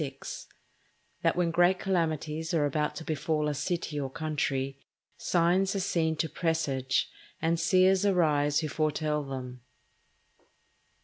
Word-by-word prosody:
—_That - - +3
when 175 -1 +1
great 175 +2 +4
Calamities 160 -3 -1
are 150 -3 +3
about 150 +1 -1
to - - -6
befall 155 0 -1
a 150 - 0
City 150 0 -2
or 135 -2 -3
Country, 135 -3 -2 0.4
Signs 180 +3 +2
are - - 0
seen 165 -4 0
to 160 - -1
presage, 150 -7 0 0.3
and 165 +1 +1
Seers 185 +3 +4
arise 155 -6 +2
who 155 - -2
foretell 150 0 -1
them_. 130 -2 -6
160 Hz, 125 wpm, -29 LUFS, 145-175 Hz, 0.4 s, great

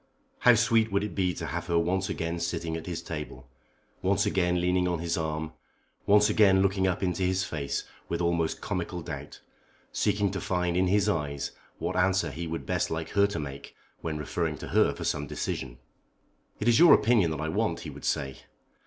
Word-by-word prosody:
How 125 -1 +6
sweet 115 -1 +3
would 100 +1 +1
it 105 - -4
be 95 -2 +1
to - - -5
have - - -4
her 85 - +1
once 95 +4 0
again 85 -2 -2
sitting 85 -1 -2
at 80 - -6
his 85 -2 -4
table, 75 -5 -7 0.5
once - - +2
again 90 -2 +1
leaning 90 +1 +2
on 90 -1 0
his 85 +1 -2
arm, 80 -1 -3 0.5
once 105 +1 +6
again 95 -3 +5
looking 95 -1 +2
up 95 +1 -1
into 90 0 -1
his 95 +1 +1
face 70 -6 -3 0.3
with - - -1
almost 85 -2 0
comical - - -3
doubt, - - -8 0.5
seeking 100 -1 +1
to 95 - -4
find 90 -1 0
in 90 +1 +3
his 100 +2 +2
eyes 70 -7 -1 0.3
what - - -3
answer 95 +1 +2
he 85 +1 -5
would 80 +1 -4
best - - 0
like 80 0 -3
her 100 0 +3
to 100 - -5
make 70 -3 -7 0.3
when 80 -2 -3
referring 75 - -2
to - - -8
her - - +4
for - - -6
some 75 0 -1
decision. - - -4 0.8
"It 105 - -2
is 120 +2 +5
your 170 -3 +9
opinion 110 -7 +3
that 80 - -3
I 80 +1 -2
want," - - -1
he - - -7
would - - -11
say. 65 -1 -1
90 Hz, 200 wpm, -28 LUFS, 80-95 Hz, 0.8 s, your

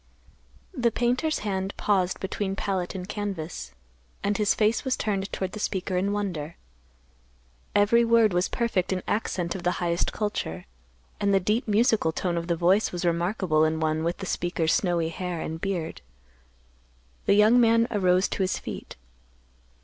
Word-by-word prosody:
The 240 -7 +2
painter's 250 +7 0
hand 195 -1 -2
paused 190 -3 +1
between 195 0 -3
palette 190 -2 -2
and 180 -1 -5
canvas, 190 - -5 0.5
and 205 +1 +1
his 210 0 +2
face 215 +1 +2
was 260 -1 0
turned 195 -2 -2
toward 190 -1 -3
the 210 - -7
speaker 190 -2 -2
in 190 +3 +1
wonder. 180 -7 -3 1.2
Every 205 +3 +5
word 230 -3 +4
was 180 +1 +1
perfect 210 -7 0
in 185 -1 -1
accent 180 -5 -1
of 190 - -6
the 180 +1 +1
highest 170 0 0
culture, 150 - -3 0.5
and 200 -1 +2
the - - +5
deep 210 +7 0
musical 215 -5 +3
tone 175 +2 -2
of 170 0 -3
the 170 - +1
voice 180 +5 +3
was 175 0 -3
remarkable 170 -1 +1
in 160 0 +1
one 155 0 0
with 170 +1 -1
the 195 - -6
speaker's 175 -3 0
snowy 175 -4 +1
hair 180 0 -4
and 160 0 -5
beard. 180 -5 -3 1.3
The 200 - +5
young 215 +4 +6
man 230 0 +4
arose 185 -3 +3
to - - -3
his 190 0 +1
feet. - - -7
190 Hz, 165 wpm, -26 LUFS, 175-210 Hz, 1.3 s, young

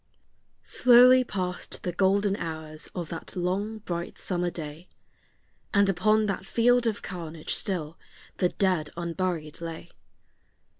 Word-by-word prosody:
Slowly 255 +1 +6
passed 185 -6 -4
the 180 - -1
golden 195 +2 +2
hours 155 -1 -5
of 175 -3 -4
that 165 - -7
long 190 +5 -1
bright 175 -4 -5
summer 175 -1 -1
day, 160 +1 -7 0.9
And 200 0 +5
upon 215 +4 +3
that 195 -2 -2
field 240 +3 +3
of 215 -2 -2
carnage 165 -4 -5
still 165 -5 -2 0.4
the 180 - +2
dead 180 -7 0
unburied 170 -2 -3
lay. 165 -1 -7
180 Hz, 120 wpm, -27 LUFS, 165-200 Hz, 0.9 s, Slowly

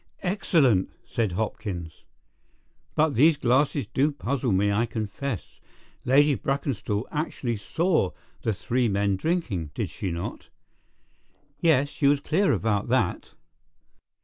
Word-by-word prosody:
"Excellent!" 155 - +2 0.2
said 110 -6 -1
Hopkins. 90 -5 -4 0.9
"But 155 -1 +3
these 150 +6 +5
glasses 135 +3 +2
do 145 +3 +1
puzzle 135 -3 -2
me, 100 +2 +2
I 115 +4 +1
confess. 110 +1 -5 0.5
Lady 145 +3 +5
Brackenstall 125 -3 -2
actually 135 -6 -2
saw 160 - +1 0.3
the 110 - 0
three 120 +4 0
men 100 -1 +1
drinking, 105 - -1
did - - -2
she 95 - -4
not?" 85 0 -5 1.1
"Yes; 145 -4 +3
she 140 - 0
was 145 0 +4
clear 180 +7 +2
about 105 -3 0
that." - - 0
125 Hz, 120 wpm, -26 LUFS, 100-145 Hz, 1.1 s, these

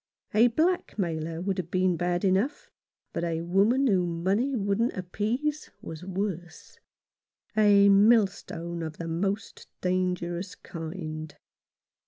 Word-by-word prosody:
A 225 +3 +6
blackmailer 190 - -1
would 190 0 -1
have 170 -2 -4
been 185 0 +2
bad 175 +2 0
enough, 195 +9 0 0.4
but - - -2
a 165 -1 -1
woman 200 +10 +3
whom 175 -7 +1
money 230 +9 +1
wouldn't 205 +2 0
appease 230 - -2
was 165 -6 -8
worse 185 -2 -5 0.4
— - - -47
a 205 -2 +6
millstone 195 -5 +3
of 160 -2 -5
the 165 - -5
most 195 +6 -3
dangerous 180 0 -1
kind. 160 -2 -7
185 Hz, 120 wpm, -27 LUFS, 170-210 Hz, 0.4 s, A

